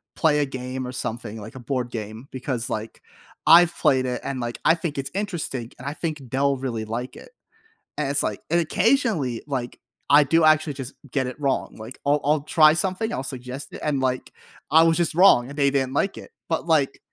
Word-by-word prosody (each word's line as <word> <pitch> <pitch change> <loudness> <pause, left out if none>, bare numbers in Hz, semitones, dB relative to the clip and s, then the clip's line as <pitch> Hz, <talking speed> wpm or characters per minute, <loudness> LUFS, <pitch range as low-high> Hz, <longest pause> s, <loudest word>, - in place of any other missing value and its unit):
play 150 -3 +3
a 145 - +2
game, 130 -1 -5
or - - -5
something 115 -3 -4
like 110 +4 -10
a - - -7
board 125 0 -3
game 110 +2 -7
because, 125 -2 -3
like, 110 +1 -5 0.5
I've 170 +1 +7
played 130 -1 +3
it, 125 -1 -3
and, 135 -2 -4
like, 120 -1 -4
I 165 - +6
think 165 -4 -4
it's 135 0 -3
interesting, 170 - -3
and 130 - -8
I 145 - -2
think 155 -2 -4
they'll 140 +1 +2
really 120 -4 -4
like 120 +4 -5
it, - - -13 0.7
and 145 -2 -1
it's, 140 0 +3
like 105 - -3
and 170 +1 +3
occasionally, 185 - +1
like, 130 -4 -4 0.3
I 145 +1 +7
do 165 +3 +3
actually 155 -1 +4
just 135 0 -7 0.2
get 130 0 0
it 125 +4 -7
wrong. 140 -2 -1
Like, 110 +4 -9
I'll 145 +1 +3
I'll 150 0 +2
try 155 0 +5
something, 190 +6 -1
I'll - - -2
suggest 130 +1 -6
it, - - -8
and, 145 -3 0
like, 130 -1 -2 0.4
I 160 +2 +7
was 165 0 +3
just 170 -3 0
wrong, 170 -9 +6
and 140 - -9
they 140 -1 +3
didn't 135 -1 -1
like 195 +7 0
it, - - -12 0.2
but, 160 0 -2
like 150 -5 +1
140 Hz, 215 wpm, -24 LUFS, 125-155 Hz, 0.7 s, I've